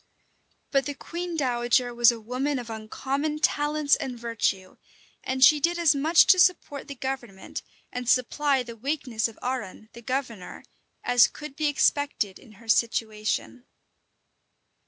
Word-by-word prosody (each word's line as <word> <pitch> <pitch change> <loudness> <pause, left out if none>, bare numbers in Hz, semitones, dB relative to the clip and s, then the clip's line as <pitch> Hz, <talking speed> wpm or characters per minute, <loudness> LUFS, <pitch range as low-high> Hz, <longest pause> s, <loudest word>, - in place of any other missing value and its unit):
But 275 -1 +1
the 285 - -4
queen 340 +3 -5
dowager 245 -2 +1
was 240 0 +6
a 235 - -7
woman 255 +6 -2
of 240 -2 -6
uncommon 270 +7 -3
talents 295 0 +2
and 250 -2 -5
virtue; 225 -5 -2 0.5
and 260 0 0
she 295 +3 +7
did 340 +4 +1
as 335 -3 +4
much 310 +4 +5
to 370 - +5
support 320 -6 +2
the 280 - -7
government, 245 -7 -6 0.3
and 245 -1 -4
supply 265 +2 +2
the 235 -1 -9
weakness 250 -2 -2
of 225 - -13
Arran, 230 -4 -5
the 235 - -11
governor, 240 -6 -5 0.4
as 245 -1 +5
could 300 -2 -10
be 310 0 0
expected 285 -8 0
in 225 -5 -17
her 225 +3 -18
situation. 220 +2 -1
255 Hz, 145 wpm, -26 LUFS, 235-290 Hz, 0.5 s, she